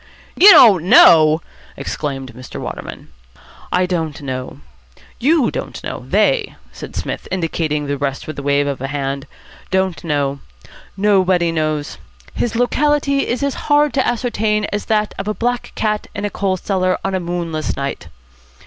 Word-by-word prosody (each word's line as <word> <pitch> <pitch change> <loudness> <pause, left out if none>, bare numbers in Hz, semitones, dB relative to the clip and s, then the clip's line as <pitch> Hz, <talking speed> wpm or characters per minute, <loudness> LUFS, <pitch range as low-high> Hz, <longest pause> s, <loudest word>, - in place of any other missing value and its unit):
"You 395 - +8
don't 215 - +8
know!" 155 -3 +7 0.4
exclaimed 135 -4 -5
Mr. 130 +2 -9
Waterman. - - -7 0.6
"I 180 0 +2
don't 165 -5 -3
know. 130 -2 -6 0.6
You 290 0 +2
don't - - -6
know. - - -6
They," 460 -4 +1 0.2
said - - -10
Psmith, - - -4
indicating 160 -4 -2
the 140 -1 -3
rest 135 -1 -3
with 155 -2 -6
a - - -4
wave 140 0 +1
of 140 -1 -3
the 135 - -3
hand, 140 -1 -4 0.4
"don't 190 -2 -1
know. 140 -3 -1 0.6
Nobody 185 -4 +2
knows. 155 -2 -2 0.3
His 240 - -2
locality 280 +3 +1
is 250 +4 -2
as 280 -1 0 0.2
hard 290 -1 +4
to 265 - +1
ascertain 220 -3 0
as 205 - -2
that 215 -1 0
of 195 - -4
a 215 - -1
black 245 +1 -2
cat 215 -1 -1
in 205 0 -3
a 205 - -3
coal 190 -2 -1
cellar 185 -1 0
on 195 - -1
a 190 - 0
moonless 170 -3 -3
night. 140 0 -4
185 Hz, 155 wpm, -18 LUFS, 145-220 Hz, 0.6 s, You